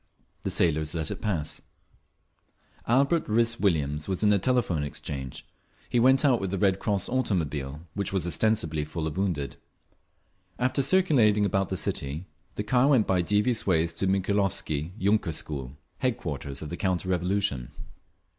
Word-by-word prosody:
The - - -2
sailors 80 -1 +2
let 80 -1 -2
it - - -6
pass…. 85 -9 -2 1.3
Albert 140 +7 +2
Rhys 115 +2 +2
Williams 75 -6 0
was 95 +1 -2
in 105 - +5
the 100 -1 +4
Telephone 100 - +1
Exchange. 65 -2 -6 0.4
He 120 - +2
went 130 +4 +5
out 130 -4 +3
with 95 - -2
the 100 - -2
Red 95 -1 +2
Cross 100 -3 0
automobile, 80 - -2
which 100 -2 -2
was 95 -3 -1
ostensibly 85 -5 +1
full 80 +1 -4
of 80 -2 -3
wounded. 85 -8 -2 1.0
After 130 +2 +1
circulating 130 - +3
about 95 -1 0
the - - -2
city, 70 +6 -2 0.3
the 105 - -2
car 125 +5 +3
went 130 -7 +4
by 95 -2 +2
devious 105 +6 +1
ways 85 -2 +2
to 95 +3 0
the - - +2
Mikhailovsky 95 -6 0
yunker 100 -4 +1
school, 70 -3 -5 0.2
headquarters 75 - -3
of 75 - -6
the 85 - -5
counter 95 -1 -1
revolution. 90 -8 -1
95 Hz, 155 wpm, -27 LUFS, 80-110 Hz, 1.3 s, in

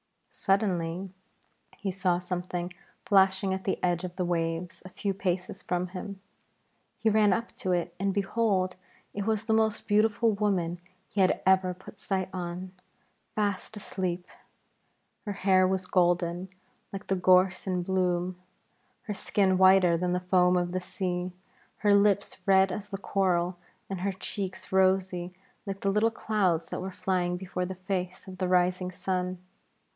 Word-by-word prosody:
Suddenly 190 -2 0 0.7
he 200 -1 -2
saw 185 -2 +1
something 180 0 -4 0.3
flashing 190 -1 +4
at 190 0 -4
the 190 - 0
edge 175 -1 +1
of 180 -1 -5
the 180 - -1
waves 165 0 -2
a 185 - -9
few 195 +2 -2
paces 180 -1 -2
from 180 0 -2
him. 195 +1 -7 0.8
He 220 0 +2
ran 210 -1 +4
up 230 +3 -2
to 185 - -2
it 175 -1 -1
and, 195 +1 +1
behold, 195 -2 +1 0.4
it 205 +1 -3
was 220 -1 0
the 220 - +1
most 220 -1 +1
beautiful 220 +2 +3
woman 185 -4 0 0.3
he 200 - -1
had 185 - +2
ever 185 -1 +3
put 190 +2 -14
sight 190 -2 -1
on, 180 0 -5 0.6
fast 205 0 -1
asleep. 185 -3 -3 1.0
Her 205 - -1
hair 190 -1 +4
was 190 0 -1
golden, 175 0 +1 0.4
like 195 0 -6
the 195 - 0
gorse 185 +1 +4
in 180 -1 0
bloom; 180 -1 0 0.6
her 210 - -4
skin 190 -2 +1
whiter 185 -2 +6
than 180 +1 0
the 180 - +1
foam 180 0 +3
of 175 0 0
the 185 0 -2
sea, 180 0 -3 0.5
her 205 -2 +3
lips 200 0 +2
red 190 -1 +5
as 205 +2 -5
the 195 - -4
coral, 180 -3 0 0.3
and 190 -2 -4
her 200 +1 0
cheeks 190 0 -5
rosy 185 -1 +2 0.3
like 195 0 -4
the 195 - +1
little 210 +3 +3
clouds 200 -7 0
that - - -3
were 190 - -4
flying 180 -2 -1
before 180 -1 -3
the 190 - -5
face 185 0 -4
of 185 -1 -9
the 185 - 0
rising 180 0 +2
sun. 185 0 -2
185 Hz, 160 wpm, -28 LUFS, 180-195 Hz, 1.0 s, whiter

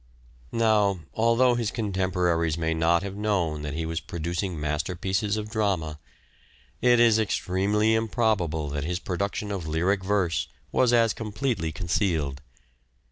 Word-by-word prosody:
Now, 105 -5 +2
although 115 +2 +3
his 120 -3 -1
contemporaries 90 -7 0
may 80 -1 0
not 85 +2 +2
have 100 -1 -5
known 95 -8 0
that 75 -1 -4
he 80 0 -2
was 80 0 -2
producing 85 -1 -4
masterpieces 90 +8 -1
of 105 0 -5
drama, 95 -9 -1 0.8
it 120 -1 +5
is 115 -2 +5
extremely 105 +1 +1
improbable 110 - 0
that 70 0 -3
his 90 +3 -1
production 100 +3 -3
of 95 -5 -4
lyric 90 +5 +1
verse 95 -4 0 0.2
was 125 -2 +3
as 115 -2 +4
completely 105 - -2
concealed. 80 -5 -1
95 Hz, 135 wpm, -26 LUFS, 80-110 Hz, 0.8 s, it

